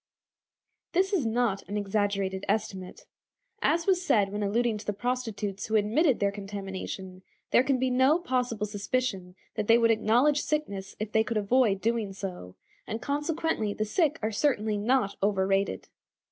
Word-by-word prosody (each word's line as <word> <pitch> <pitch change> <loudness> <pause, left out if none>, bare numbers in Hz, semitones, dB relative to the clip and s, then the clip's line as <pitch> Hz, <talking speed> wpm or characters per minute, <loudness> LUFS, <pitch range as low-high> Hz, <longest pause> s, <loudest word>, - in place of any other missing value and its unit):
This 380 +3 +2
is 310 -12 +1
not 225 -3 0
an 205 - -2
exaggerated 200 -1 -1
estimate. 195 -3 -3 0.6
As 335 0 +2
was 370 -2 +2
said 205 - +2
when 205 +1 -3
alluding 220 +2 +1
to 210 - -10
the 205 - 0
prostitutes 215 -4 -3
who 220 - -1
admitted 230 +7 +3
their 200 -1 +2
contamination, 195 -2 -6 0.3
there - - +6
can 265 0 +1
be 255 0 0
no 260 +5 +4
possible 250 - -1
suspicion 205 -3 -2 0.2
that 215 -1 -3
they 230 - +7
would 230 -1 +4
acknowledge 245 +7 +3
sickness 200 -11 -3
if 215 0 -4
they 220 0 +3
could 225 0 -2
avoid 210 -1 +2
doing 225 -3 -1
so, 180 - -7 0.3
and 220 - -3
consequently 290 -4 -1
the 215 - -1
sick 310 - +1
are 215 - 0
certainly 220 -3 +1
not 230 -1 +1
overrated. 195 0 +1
215 Hz, 160 wpm, -28 LUFS, 200-255 Hz, 0.6 s, they